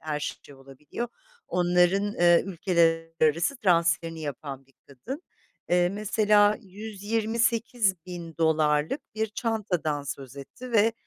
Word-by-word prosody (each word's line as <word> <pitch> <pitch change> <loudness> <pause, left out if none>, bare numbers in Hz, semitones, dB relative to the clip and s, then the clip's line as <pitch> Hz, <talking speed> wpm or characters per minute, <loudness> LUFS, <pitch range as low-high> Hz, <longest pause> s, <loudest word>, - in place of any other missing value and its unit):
her 155 -1 -3 0.2
şey 145 - -14
olabiliyor. 135 - -7 0.4
Onların, 180 +3 +2
eee, 175 -1 +5
ülkeler 165 -2 +1
arası 165 - +2
transferini 165 -5 +1
yapan 140 -2 -6
bir 135 - -29
kadın. 240 - -8 0.5
Eee, 175 0 +3
mesela 210 +1 +3
$128.000'lık 195 - 0
bir 220 0 0
çantadan 200 - -2
söz 135 -1 -7
etti 240 - -10
ve 225 0 +4
175 Hz, 105 wpm, -27 LUFS, 155-215 Hz, 0.5 s, eee